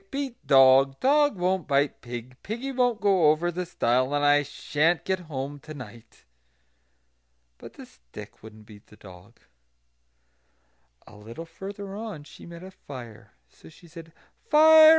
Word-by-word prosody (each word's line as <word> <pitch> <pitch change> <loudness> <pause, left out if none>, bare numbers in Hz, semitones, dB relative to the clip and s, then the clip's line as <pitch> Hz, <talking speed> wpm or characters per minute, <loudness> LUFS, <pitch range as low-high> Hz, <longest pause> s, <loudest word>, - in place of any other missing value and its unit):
beat 275 -1 -4
dog! 135 0 +5
dog 290 -2 +3
won't 180 -1 -1
bite 140 0 0
pig; 120 +1 -8
piggy 240 +6 -5
won't 245 -3 +1
go 190 -7 +3
over 165 +3 +1
the 180 +1 -5
stile; 130 +2 0
and 145 0 +1
I 145 0 +5
sha'n't 155 +3 -1
get 190 -1 -1
home 145 -4 -6
to 155 +2 -11
night." 115 -3 -13 1.4
But - - -12
the - - -12
stick - - -14
wouldn't 110 0 -14
beat 105 -1 -16
the - - -18
dog. 95 +4 -16 1.7
A - - -16
little 115 +10 -10
further 195 +3 -9
on 210 -8 -7
she 145 - -14
met 170 +1 -11
a 190 - -10
fire. 120 - -12
So 80 - -18
she 170 - -18
said: 165 0 -12 0.4
"Fire! 315 +1 +8
155 Hz, 150 wpm, -26 LUFS, 125-195 Hz, 1.7 s, Fire